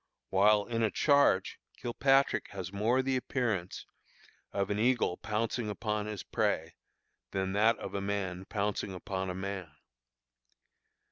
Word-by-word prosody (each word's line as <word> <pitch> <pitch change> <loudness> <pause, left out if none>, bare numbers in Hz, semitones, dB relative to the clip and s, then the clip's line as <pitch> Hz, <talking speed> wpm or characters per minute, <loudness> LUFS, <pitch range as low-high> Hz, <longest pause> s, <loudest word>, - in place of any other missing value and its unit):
While 105 +2 +5
in 115 -1 -2
a 110 - +3
charge, 140 -8 +3 0.2
Kilpatrick 135 +3 +2
has 95 -1 -6
more 115 +6 +2
the 135 0 0
appearance 115 -8 -2 0.7
of 100 0 -1
an 105 - 0
eagle 120 -6 +2
pouncing 110 +1 -2
upon 105 0 -2
his 105 -3 -5
prey, 95 -7 -1 0.6
than 95 +3 -2
that 110 +3 +4
of - - -7
a 100 - -2
man 95 -2 -2
pouncing 100 -1 -2
upon 95 +1 -3
a 90 - -3
man. 95 -2 -4
105 Hz, 135 wpm, -31 LUFS, 95-115 Hz, 0.7 s, While